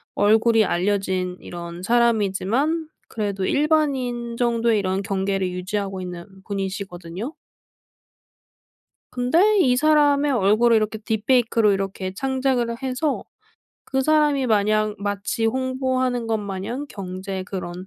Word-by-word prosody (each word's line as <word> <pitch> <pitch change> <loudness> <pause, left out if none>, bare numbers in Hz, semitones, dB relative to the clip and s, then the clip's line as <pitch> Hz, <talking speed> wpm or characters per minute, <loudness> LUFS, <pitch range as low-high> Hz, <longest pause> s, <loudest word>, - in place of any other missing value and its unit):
얼굴이 220 +1 +4
알려진 185 -1 -1
이런 170 0 -8
사람이지만 235 - +1 0.2
그래도 200 -3 -2
일반인 265 -6 0
정도의 235 -2 +2
이런 190 0 -1
경계를 195 -1 -1
유지하고 190 +1 -3
있는 180 -1 -7 0.2
분이시거든요. 195 - -5 1.8
근데 335 +13 +3
이 255 -7 +4
사람의 290 0 +3
얼굴을 225 +2 +4
이렇게 220 0 -1
딥페이크로 225 0 +2
이렇게 195 -1 -3
창작을 260 0 0
해서 265 +3 -1 0.6
그 265 0 -1
사람이 295 -2 +3
마냥 215 0 +2
마치 205 +3 -2
홍보하는 260 -1 -1
것 225 -1 +1
마냥 210 +7 -5
경제 190 -2 -5
그런 185 -1 -6
220 Hz, 280 characters per minute, -23 LUFS, 195-255 Hz, 1.8 s, 얼굴이